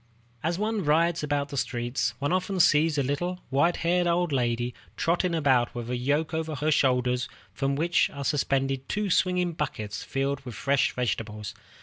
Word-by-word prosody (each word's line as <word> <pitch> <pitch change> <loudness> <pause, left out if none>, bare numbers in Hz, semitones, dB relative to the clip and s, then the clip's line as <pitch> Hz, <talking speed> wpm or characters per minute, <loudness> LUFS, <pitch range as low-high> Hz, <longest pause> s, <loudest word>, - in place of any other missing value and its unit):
As 165 +2 -1
one 215 0 -1
rides 165 +3 +2
about 145 -1 -1
the 140 - -5
streets, 120 0 -1
one 145 +2 -1
often 185 +1 -1
sees 155 -1 +4
a 140 - +2
little, 175 +7 -2
white 155 +6 +3
haired 175 +1 +2
old 175 -1 +1
woman 120 -2 0 0.2
trotting 170 +1 +1
about 130 -7 +2
with 120 0 -4
a - - 0
yoke 145 +6 0
over 160 -1 -2
her 150 +3 0
shoulders 125 -3 +2 0.2
from 135 +4 -1
which 170 +4 +2
are 140 -1 -6
suspended 135 -2 0
two 210 -2 -1
swinging 180 0 +2
baskets, 105 - -4
filled 135 0 -1
with 125 -5 -9
fresh 140 +7 +2
vegetables. 105 -3 -3
145 Hz, 175 wpm, -27 LUFS, 125-170 Hz, 0.2 s, sees